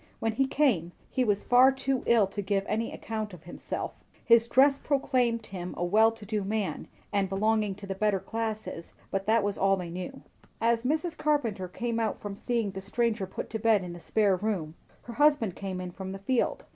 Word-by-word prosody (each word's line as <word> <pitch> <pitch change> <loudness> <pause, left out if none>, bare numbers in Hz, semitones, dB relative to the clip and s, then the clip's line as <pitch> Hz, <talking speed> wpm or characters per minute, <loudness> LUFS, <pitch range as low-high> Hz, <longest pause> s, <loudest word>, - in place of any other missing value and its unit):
When 225 - 0
he 265 +5 +1
came, 225 - +1 0.2
he 255 - +1
was 205 -3 +1
far 255 +2 +6
too 270 -1 -1
ill 230 -3 +5
to 200 +2 -5
give 195 0 0
any 225 +2 -1
account 215 -3 -5
of 160 - -16
himself; 175 - -5 0.3
his 230 -1 +6
dress 275 +3 +5
proclaimed 250 -5 +1
him 180 -3 -6
a 175 - -1
well 220 +5 +5
to 225 -2 -12
do 210 0 -1
man, 205 0 -2 0.3
and 195 -2 +1
belonging 210 0 +1
to 200 +1 -10
the 195 - -3
better 200 0 +1
classes; 220 -5 -5 0.2
that 210 +3 +2
was 205 0 -1
all 195 0 +3
they 175 -2 -5
knew. 180 +1 -6 0.4
As 230 0 +2
Mrs. 315 +4 0
Carpenter 235 -11 0
came 230 +5 -3
out 225 -2 -1
from 205 -1 -6
seeing 230 -1 -1
the 190 0 -6
stranger 220 0 -1
put 190 - -6
to 220 - -2
bed 215 -3 +3
in 175 -1 -6
the 175 - -9
spare 205 +2 +2
room, 185 -6 -2 0.3
her 235 - -8
husband 285 -8 +3
came 190 -2 -4
in 180 -1 -5
from 190 +1 -6
the - - -5
field. 235 +6 0
215 Hz, 205 wpm, -28 LUFS, 195-235 Hz, 0.4 s, far